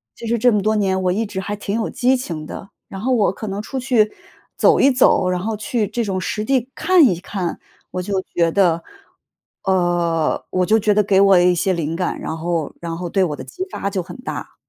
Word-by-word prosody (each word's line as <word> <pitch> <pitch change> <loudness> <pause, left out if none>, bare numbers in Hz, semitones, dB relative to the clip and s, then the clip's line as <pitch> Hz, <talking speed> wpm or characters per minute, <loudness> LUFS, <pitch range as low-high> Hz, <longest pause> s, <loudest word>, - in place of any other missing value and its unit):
其 - - -9
实 235 0 0
这 245 +1 +4
么 210 - +2
多 215 0 +2
年 190 -3 +1
我 180 - +2
一 220 +5 0
直 190 -2 -5
还 205 +2 -3
挺 200 0 -4
有 220 - -1
激 255 +1 +1
情 160 -11 -6
的。 195 - -8 0.2
然 195 - -8
后 255 +4 0
我 210 -6 +3
可 215 - -8
能 200 +1 -3
出 265 +4 -5
去 235 -5 +2 0.5
走 - - +4
一 275 - +6
走， 255 -7 +3
然 180 -1 0
后 215 +3 -2
去 215 0 -1
这 235 +3 -2
种 190 -3 -2
实 210 +3 -3
地 260 +1 0
看 360 -5 +4
一 180 -7 +2
看， 180 -2 -4 0.3
我 185 - -3
就 195 +1 -1 0.2
觉 170 -1 +3
得 170 -4 +2 0.8
呃， 175 -3 +1
我 185 -1 +1
就 220 +3 +3
觉 210 0 +2
得 210 0 +3
给 195 -1 +3
我 195 -2 +6
一 180 0 +4
些 185 +2 0
灵 165 -2 -2
感， 180 +1 -2
然 160 - -4
后 165 -2 -2
然 165 -1 -4
后 175 0 -4
对 190 +2 +1
我 150 -5 -1
的 - - -8
激 375 - -6
发 200 - -3
就 190 - -1
很 175 +5 -10
大。 250 - -7
195 Hz, 255 characters per minute, -20 LUFS, 175-220 Hz, 0.8 s, 一